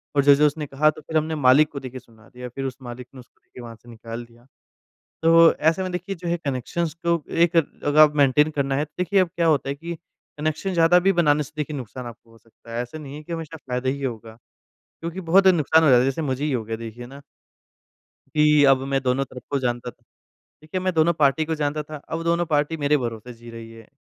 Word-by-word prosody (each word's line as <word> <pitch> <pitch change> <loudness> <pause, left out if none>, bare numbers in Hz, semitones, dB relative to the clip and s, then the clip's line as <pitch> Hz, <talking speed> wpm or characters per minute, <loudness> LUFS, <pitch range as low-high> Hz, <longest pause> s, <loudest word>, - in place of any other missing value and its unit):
और 140 - +3
जो-जो 145 +1 +5
उसने 150 +1 -4
कहा 145 +2 +2
तो 155 0 -6
फिर 160 +1 -2
हमने 155 +1 -1
मालिक 145 +1 +4
को 140 - -6
देखिए 130 -1 -8
सुना 110 -2 -22
दिया 125 0 -8
फिर 135 +3 -6
उस 130 -1 -5
मालिक 125 0 -9
ने 130 - -12
उसको 125 - -18
देखिए 125 - -13
वहाँ 115 -1 -9
से 120 +2 -19
निकाल 115 +1 -8
दिया। 120 +1 -23 0.8
तो 165 0 +6
ऐसे 160 +4 +1
में 185 - -3
देखिए 180 +2 -4
जो 175 0 -6
है 170 - +1
कनेक्शंस 145 +4 -3
तो 170 -2 +1
एक 170 0 +2
अगर 145 -2 0
आप 150 -1 +7
मेंटेन 145 +2 +4
करना 140 -2 -1
है 145 - 0
तो 150 - -23
देखिए 180 +2 +2
अब 185 - +1
क्या 170 -1 +1
होता 150 -4 +2
है 140 - -2
कि 165 +4 -7 0.4
कनेक्शन 155 +5 -2
ज़्यादा 170 +1 +5
भी 195 +2 +3
बनाने 150 -4 +2
से 145 +1 -12
देखिए 150 0 -4
नुकसान 125 -1 -8
आपको 115 0 -12
हो 115 - -19
सकता 115 +1 -15
है 120 - -1
ऐसा 125 +6 -9
नहीं 145 -2 -9
है 150 - -9
कि 170 - -9
हमेशा 165 -1 -6
फायदा 130 -3 -4
ही 140 +1 -2
होगा, 115 -4 -5 0.7
क्योंकि 170 +3 -5
बहुत 190 +3 +3
नुकसान 160 -3 +4
हो - - +4
जाता 125 - +7
है - - +2
जैसे 135 +4 -1
मुझे 135 -1 -2
ही 150 - -1
हो 120 -4 -2
गया 110 +1 -4
देखिए 115 +1 -9
ना। 135 +3 -12 1.1
कि 150 -1 +4
अब 135 - +4 0.2
मैं 135 - +2
दोनों 130 +1 0
तरफ 125 -1 -12
को 140 - +1
जानता 120 -1 -3
था, - - -35 0.6
देखिए 155 +4 -5
मैं 185 0 -1
दोनों 165 +1 +3
पार्टी 145 +2 +3
को 160 +1 -2
जानता 150 0 -2
था 155 +1 -9
अब 165 +1 -3
दोनों 170 +1 +1
पार्टी 150 0 0
मेरे 150 0 +2
भरोसे 120 -1 -6
जी 120 0 -14
रही 115 -1 -10
है। 115 -1 -14
145 Hz, 245 wpm, -23 LUFS, 125-160 Hz, 1.1 s, आप